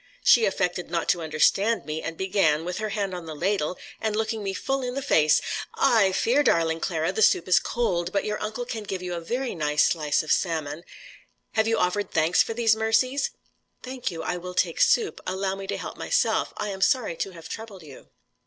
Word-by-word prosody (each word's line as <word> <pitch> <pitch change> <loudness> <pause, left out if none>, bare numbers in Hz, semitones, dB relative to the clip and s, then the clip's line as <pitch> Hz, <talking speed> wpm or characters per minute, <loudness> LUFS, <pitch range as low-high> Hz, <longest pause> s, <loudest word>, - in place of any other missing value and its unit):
She 235 -2 +6
affected 180 -3 -1
not 170 -1 -1
to 175 - +2
understand 160 +6 +2
me, 155 +1 -4
and 165 0 -5
began, 185 -5 +1
with 180 +2 -4
her 215 0 -2
hand 200 -2 -2
on 175 -2 -7
the 155 - -6
ladle, 180 0 -1 0.2
and 220 -1 -1
looking 220 0 -1
me 195 -1 -2
full 270 +7 -2
in 250 0 -4
the 275 - -2
face: 155 - +4 0.3
"I 225 - +4
fear, 235 +9 +2
darling 165 - +2
Clara, 160 -1 -1
the 205 - -2
soup 180 - +4
is 180 - +5
cold; 180 -7 -1
but 200 - 0
your 210 0 -3
uncle 220 +3 -4
can 225 -2 -5
give 195 -3 -5
you 180 -1 -4
a 170 - -4
very 245 +9 -3
nice 150 -3 +1
slice 150 -3 0
of 155 - -4
salmon. 160 -2 -1 0.7
Have 220 0 +1
you 225 0 +2
offered 200 +2 0
thanks 160 +2 +3
for 225 - -2
these 225 -2 +3
mercies?" 255 +5 +1 0.5
"Thank 255 0 -4
you, 165 -2 -6
I 180 - -2
will 180 +1 -8
take 170 -3 +1
soup. 440 -3 +2
Allow 190 +1 -1
me 195 0 -7
to - - -2
help - - -7
myself. - - +1
I 210 - -3
am 190 -1 -6
sorry 215 -3 +2
to - - -2
have 165 -2 -11
troubled 215 -5 -8
you." 140 -4 -14
190 Hz, 215 wpm, -25 LUFS, 165-220 Hz, 0.7 s, She